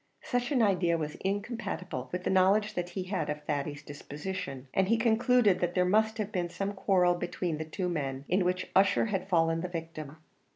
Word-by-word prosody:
Such 245 0 -1
an 255 -5 +3
idea 180 -5 +2
was 150 -2 -3
incompatible 195 - -3
with 180 0 -3
the - - 0
knowledge 195 +3 +3
that 175 0 -3
he 190 - -1
had 185 -3 -2
of 150 0 -4
Thady's 145 0 -3
disposition, 145 0 -6
and 190 -1 +2
he 230 +3 +3
concluded 230 -2 +3
that 175 0 -1
there 180 -1 +3
must 220 +4 +2
have 215 -1 -3
been 175 -3 -1
some 195 +3 -3
quarrel 185 -2 +3
between 175 -2 -3
the 160 - -3
two 180 +4 -3
men, 140 -5 -3
in 185 +1 +2
which 180 +1 -1
Ussher 195 +3 +4
had 190 0 -2
fallen 165 -2 +2
the 180 - -2
victim. 165 -3 -7
180 Hz, 200 wpm, -30 LUFS, 165-200 Hz, -, Ussher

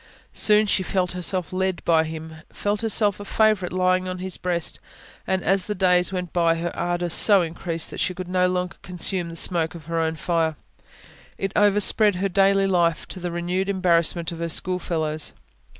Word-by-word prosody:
Soon 210 0 +4
she 205 - +1
felt 185 -1 -1
herself 180 0 -2
led 190 -1 -2
by 160 -1 +3
Him, 160 0 -8
felt 205 +1 -2
herself 215 -3 +1
a - - -6
favourite 215 -3 +1
lying 185 0 +1
on 185 0 -4
His 185 0 -6
breast; 175 -2 -2 0.5
and, 190 -1 0
as 190 +1 +1
the 210 - -3
days 180 -1 +2
went 180 -2 -5
by, 170 -2 +2
her 170 +1 -4
ardour 175 0 -2
so 195 +3 +6
increased 165 0 -4
that - - -7
she 185 - -1
could 185 0 -6
not 180 0 +1
longer 180 -1 -3
consume 180 0 -2
the 165 - -9
smoke 165 -1 0
of 160 -3 -11
her 165 +1 -2
own 160 0 -1
fire: 160 -1 -1 0.8
it 195 - -3
overspread 205 0 +4
her 195 +2 -1
daily 195 +1 +3
life 175 -4 +1
to 185 - -6
the 180 0 -4
renewed 175 +3 -2
embarrassment 170 -3 +1
of 165 - -8
her 170 0 -3
schoolfellows. 160 -3 -2
180 Hz, 185 wpm, -23 LUFS, 170-190 Hz, 0.8 s, so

